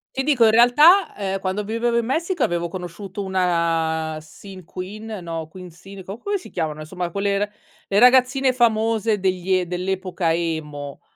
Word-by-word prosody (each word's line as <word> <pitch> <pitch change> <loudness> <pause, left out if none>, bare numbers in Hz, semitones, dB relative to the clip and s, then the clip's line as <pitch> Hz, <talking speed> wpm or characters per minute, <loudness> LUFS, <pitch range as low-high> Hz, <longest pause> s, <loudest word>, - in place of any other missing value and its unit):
Ti 270 - 0
dico, 265 -6 +4
in 220 - +5
realtà, 295 - +6
uhm, 195 -1 -2
quando 200 +2 -2
vivevo 235 +2 0
in 235 - 0
Messico 330 +5 -2
avevo 170 0 -1
conosciuto 185 +3 -7
una 165 -4 0
sin 185 +4 -13
queen, 195 +6 -8
no 165 -2 -5
queen 180 0 -11
sin, 190 +3 -12
co 195 +4 -7
come 405 +5 -2
si 370 - -13
chiamano? 155 -3 -3
Insomma 175 +3 -5
quelle 200 +1 0
ra 205 +1 -1 0.4
le 200 +1 +3
ragazzine 255 +1 +5
famose 225 -3 +1
degli 185 0 -1
e 180 - -1
dell'epoca 180 -1 -2
emo, 150 -4 -4
190 Hz, 165 wpm, -22 LUFS, 170-225 Hz, 0.4 s, realtà